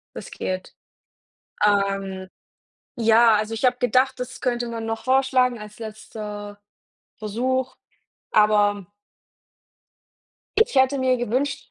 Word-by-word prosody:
Riskiert. 185 0 -5 0.9
Ähm, 195 -2 0 0.7
ja, 230 -1 +5
also, 215 +1 -1
ich 225 +3 -1
habe 250 0 +3
gedacht, 255 +2 +1
das 255 +1 -6
könnte 240 -2 -1
man 230 -1 -5
noch 225 0 -4
vorschlagen 255 -2 +2
als 210 +1 -11
letzter 210 -2 -8 0.6
Versuch, 255 +5 -2 0.6
aber 205 -2 +3 1.7
ich 445 - +3
hätte 265 +1 +3
mir 260 -1 +2
gewünscht, 250 +4 -2
225 Hz, 105 wpm, -23 LUFS, 210-255 Hz, 1.7 s, ja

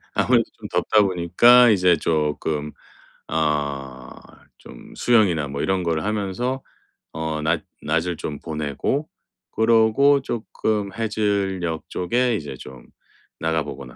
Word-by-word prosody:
아무래도 - - +3
좀 - - -8
덥다 105 - +3
보니까 105 +7 +5
이제 90 -4 +4
쪼끔 75 -1 -1 0.6
어 70 -4 -2 0.5
좀 - - -13
수영이나 95 - +2
뭐 70 +1 -4
이런 95 -1 0
거를 80 -1 -1
하면서 105 +5 -2 0.5
어 80 -1 -3
낮 80 +2 0 0.2
낮을 80 +3 -1
좀 75 -2 -5
보내고 80 - -3 0.4
그러고 115 +5 +4
쪼끔 110 -4 -3
해질녘 100 -6 -1
쪽에 120 +7 0
이제 75 -6 -7
좀 65 0 -12 0.5
나가 80 -1 0
보거나 70 -4 -9
85 Hz, 230 characters per minute, -22 LUFS, 75-110 Hz, 0.6 s, 보니까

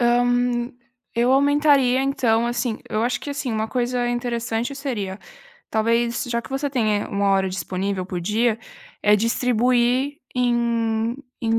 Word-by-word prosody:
hã, 245 0 +2 0.4
eu 240 +2 +3
aumentaria, 280 -2 +4
então, 235 -4 +1
assim 240 -1 -1
eu 215 - -1
acho 245 +2 0
que, 290 - -6
assim, 280 -4 -3
uma 220 0 -1
coisa 245 -1 -1
interessante 240 +1 -2
seria: 215 -9 -4 0.5
talvez, 230 +3 +1
já 235 -1 -1
que - - -13
você 275 +1 -2
tem 215 -6 +1
aí, - - -7
1 200 0 0
hora 190 -1 +2
disponível 185 0 -3
por 180 -2 -4
dia, 220 +5 +1 0.4
é 210 0 +5
distribuir 245 +4 +1 0.2
em 235 -1 +1 0.2
em 225 -1 +1
240 Hz, 145 wpm, -22 LUFS, 220-250 Hz, 0.5 s, é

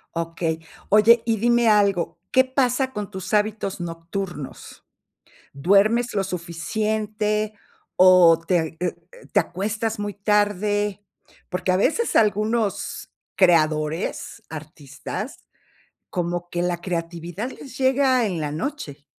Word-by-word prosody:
Okey. 165 -1 -2 0.3
Oye, 220 +3 +6
y 225 -1 +1
dime 235 +1 +3
algo, 200 -5 +2
¿qué 260 0 +5
pasa 260 0 0
con 210 -1 -5
tus 190 0 -7
hábitos 210 -2 0
nocturnos? 170 -2 -6 0.7
¿Duermes 200 - +3
lo 200 -2 +1
suficiente 210 +4 -2 0.4
o 180 -3 +7
te 180 -2 +3
eh 160 0 -4
eh, 180 0 -1 0.4
te - - +5
acuestas 215 +4 -2
muy 205 0 -3
tarde?, 205 0 0 0.5
porque 185 0 -1
a - - +3
veces 325 - +1
algunos 215 0 0 0.2
creadores, 160 +2 +1
artistas, 150 -2 -7 0.7
como 175 0 -2
que 175 0 -2
la 175 -1 -1
creatividad 175 +4 -4
les 260 -1 -11
llega 260 -2 +3
en 180 -5 -3
la 150 -1 -3
noche. 155 - -5
200 Hz, 115 wpm, -23 LUFS, 170-220 Hz, 0.7 s, o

